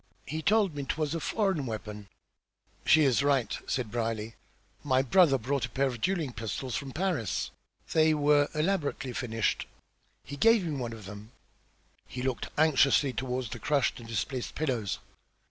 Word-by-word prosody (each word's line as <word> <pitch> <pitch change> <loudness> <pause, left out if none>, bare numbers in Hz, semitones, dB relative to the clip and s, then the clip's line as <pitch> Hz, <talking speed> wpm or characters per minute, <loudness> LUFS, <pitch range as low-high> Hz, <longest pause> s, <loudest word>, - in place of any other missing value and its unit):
He 155 +3 -4
told 205 -2 +3
me 145 - -4
'twas 150 +2 -2
a 165 - -1
foreign 190 - 0
weapon." 105 -2 -6 0.8
"She 160 0 +6
is 135 -2 +3
right," 140 -6 +1
said 120 -5 -2
Brierly. 115 -1 -2 0.5
"My 130 0 +2
brother 145 +1 +5
brought 130 +1 -1
a - - -19
pair 135 +4 0
of 125 -4 -3
duelling 170 -9 0
pistols 115 +4 -4
from 140 -2 -4
Paris. 155 - -1 0.4
They 155 -1 +4
were 145 -1 +3
elaborately 150 -5 -1
finished. 115 -3 -1 0.6
He 145 - -8
gave 225 +1 +5
me 155 -3 -2
one 120 -4 -4
of 110 -3 -10
them." 105 +3 -10 0.7
He 125 +3 -6
looked 130 -2 -2
anxiously 145 -3 +4
toward 125 -2 -3
the - - -5
crushed 145 -4 +1
and 115 -1 -11
displaced 115 +4 -3
pillows. 125 - -1
135 Hz, 160 wpm, -29 LUFS, 115-155 Hz, 0.8 s, She